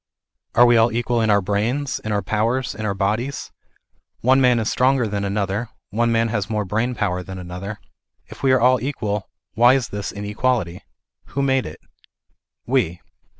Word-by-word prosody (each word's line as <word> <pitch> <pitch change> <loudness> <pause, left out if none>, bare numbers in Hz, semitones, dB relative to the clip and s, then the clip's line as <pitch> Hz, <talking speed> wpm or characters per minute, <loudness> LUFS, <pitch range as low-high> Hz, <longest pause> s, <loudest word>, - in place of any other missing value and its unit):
Are 120 - +7
we 120 -1 +5
all 115 +1 +4
equal 120 0 0
in 110 - +1
our 100 -1 +4
brains, 110 +9 -1
in 110 - -5
our 105 -1 0
powers, 115 +4 0
in 110 0 -4
our 100 - -1
bodies? 110 +8 -2 0.7
One 130 +3 +4
man 125 -2 +4
is 110 -2 -1
stronger 130 -2 +2
than 100 -1 -2
another, 100 +3 -2 0.2
one 115 +3 +1
man 115 0 +2
has 105 -2 -2
more 105 -2 -1
brain 110 +6 -1
power 90 -3 -1
than 95 +1 -8
another. 90 +3 -7 0.5
If - - -13
we 135 - +3
are 130 - +4
all 125 0 +4
equal, 105 -7 -3 0.2
why 120 +4 +6
is 125 -5 -1
this 100 0 -4
inequality? 105 -2 -1 0.4
Who 140 - -3
made 135 -1 +1
it? 80 +1 -10 0.9
We. 110 -10 0
110 Hz, 180 wpm, -21 LUFS, 100-125 Hz, 0.9 s, Are